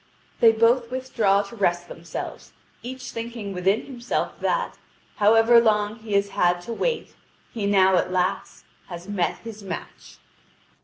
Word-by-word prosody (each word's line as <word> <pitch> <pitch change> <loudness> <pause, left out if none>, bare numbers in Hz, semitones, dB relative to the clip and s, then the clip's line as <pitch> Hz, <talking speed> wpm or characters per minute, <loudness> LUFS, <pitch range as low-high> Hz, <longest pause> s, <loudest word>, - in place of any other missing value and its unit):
Then 225 -1 +5
both 235 +1 +3
withdraw 230 -6 +1
to 200 +3 -11
rest 175 -4 0
themselves, 170 0 -8 0.3
each 255 +1 -7
thinking 230 -3 -6
within 190 +4 +1
himself 250 -3 -3
that, - - -1 0.4
however 225 +3 +6
long 210 -1 +1
he 220 -2 -7
has 200 0 +2
had 175 -2 +2
to 230 +6 -6
wait, 475 - -2 0.4
he 210 -4 -2
now 190 -2 +4
at 185 - 0
last 185 0 -2 0.2
has 175 0 -8
met 200 -4 -1
his 225 -2 -8
match. 195 - -8
210 Hz, 145 wpm, -24 LUFS, 190-235 Hz, 0.4 s, however